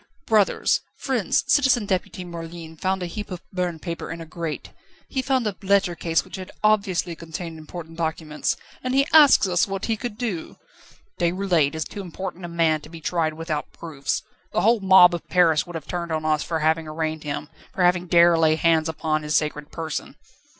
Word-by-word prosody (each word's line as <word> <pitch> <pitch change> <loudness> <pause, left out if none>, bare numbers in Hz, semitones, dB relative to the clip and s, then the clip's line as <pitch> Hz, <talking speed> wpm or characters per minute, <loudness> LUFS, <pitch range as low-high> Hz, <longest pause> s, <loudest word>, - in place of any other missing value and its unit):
Brothers, 215 -3 +3 0.2
friends, 250 -8 0
Citizen 260 -6 +3
Deputy 185 -1 -2
Merlin 165 -1 -8
found 190 +3 -1
a - - -1
heap 205 +4 -6
of 180 -2 -5
burnt 175 -3 -2
paper 170 -2 -5
in 165 - -5
a 165 - -7
grate, 165 -1 -5 0.4
he 265 - -1
found 260 -2 +1
a 210 -2 -1
letter 200 -2 +2
case 165 -1 0
which - - -8
had 185 0 -8
obviously 195 -5 +2
contained 165 0 -7
important 165 +1 -9
documents, 160 -2 -2 0.3
and 255 0 -1
he 275 0 +4
asks 295 -9 +7
us 180 +1 +2
what 195 0 -3
he 225 - 0
could 215 0 -6
do!" 215 -10 -4 0.6
"Déroulède 175 -4 +1
is 160 - -2
too 205 - -7
important 185 0 -6
a - - -4
man 165 -2 +1
to 150 - -13
be 165 0 -10
tried 160 -1 -1
without 160 -2 -4
proofs. 150 -5 -3 0.3
The - - +2
whole 225 +4 +4
mob 190 -2 +7
of 170 - -5
Paris 170 -4 +3
would 175 - -8
have 160 -3 -5
turned 170 0 -4
on 155 0 -2
us 155 -1 +2
for 160 -2 -2
having 160 +1 +1
arraigned 155 0 -3
him, 150 0 -4 0.2
for 185 - -1
having 180 0 +3
dared 170 -1 +5
lay 160 -1 +4
hands 160 -1 +2
upon 155 -1 -1
his 150 0 -2
sacred 150 -1 -3
person." 160 -2 -5
170 Hz, 195 wpm, -24 LUFS, 160-190 Hz, 0.6 s, asks